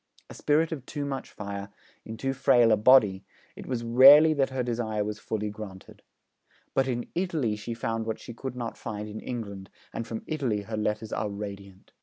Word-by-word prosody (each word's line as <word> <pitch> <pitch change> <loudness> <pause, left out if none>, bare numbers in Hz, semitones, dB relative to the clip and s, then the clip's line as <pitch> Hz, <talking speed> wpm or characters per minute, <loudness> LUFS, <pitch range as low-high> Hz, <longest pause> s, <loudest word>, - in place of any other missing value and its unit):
A - - -8
spirit 155 +3 +1
of 150 -6 -5
too 145 -1 -4
much 135 -1 -4
fire 100 -1 -6 0.4
in 110 0 -7
too 135 +2 -1
frail 125 -4 +4
a - - +6
body, 105 -4 +5 0.3
it - - -10
was 120 -3 -2
rarely 140 +7 +8
that 140 -3 +1
her 130 -1 -2
desire 115 -3 -1
was 105 +1 -4
fully 105 -2 -3
granted. 100 -3 -10 0.7
But 135 0 +2
in 120 -2 -3
Italy 160 - -1
she 115 +2 -6
found 115 0 -3
what 110 - -3
she 120 - -9
could 130 +2 -6
not 120 -2 -5
find 105 -1 -5
in 105 +1 -7
England, 100 -6 -6 0.2
and 115 - -4
from 115 - -5
Italy 130 -9 -1
her 110 +2 -5
letters 105 +1 -2
are 105 - -1
radiant. 100 -2 -8
115 Hz, 195 wpm, -27 LUFS, 105-130 Hz, 0.7 s, rarely